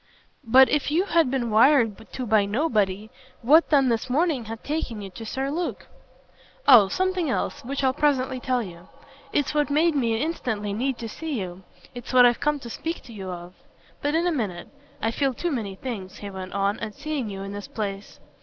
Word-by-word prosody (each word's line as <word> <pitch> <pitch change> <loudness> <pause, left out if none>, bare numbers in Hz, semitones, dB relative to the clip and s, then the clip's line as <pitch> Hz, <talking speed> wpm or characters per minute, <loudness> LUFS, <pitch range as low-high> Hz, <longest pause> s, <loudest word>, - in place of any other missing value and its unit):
"But 260 +2 +7
if 295 -1 +1
you 325 +5 +2
had 335 -8 +3
been 245 -3 -1
wired 225 -2 +3
to 255 - -4
by 215 -2 +3
nobody 215 -4 0 0.3
what 310 +8 +5
then 275 -4 +4
this 230 +2 -1
morning 290 -2 +1
had 225 +1 -7
taken 285 -7 -3
you 195 - -8
to 225 +4 -8
Sir 270 +4 -2
Luke?" 345 +3 -3 0.8
"Oh 235 -7 +9
something 370 - 0
else - - -2
which 275 +3 -3
I'll 260 -1 +3
presently 260 -3 +1
tell 250 -2 0
you. 175 -2 -11 0.4
It's 290 0 0
what 295 -1 +1
made 315 +3 +3
me 230 -5 +1
instantly 225 -9 -2
need 255 +4 -1
to 230 - -5
see 295 +3 -4
you; 180 -1 -6 0.3
it's 245 +1 -8
what 250 -1 +8
I've 240 -1 +3
come 300 0 +1
to 240 - -8
speak 330 +7 -4
to 240 - -12
you 190 -3 -7
of. 175 0 -8 0.5
But 290 +2 0
in 335 +2 +2
a 355 - +2
minute. 205 - -3 0.3
I 225 - +2
feel 270 +1 0
too 345 +6 -2
many 215 -8 -3
things," 195 -5 -6
he 200 -1 -7
went 185 -1 -7
on, 200 +1 0
"at 210 - -6
seeing 295 -7 -3
you 195 -1 -6
in 195 - -6
this 205 0 -7
place." 200 -2 -5
245 Hz, 205 wpm, -25 LUFS, 205-290 Hz, 0.8 s, Oh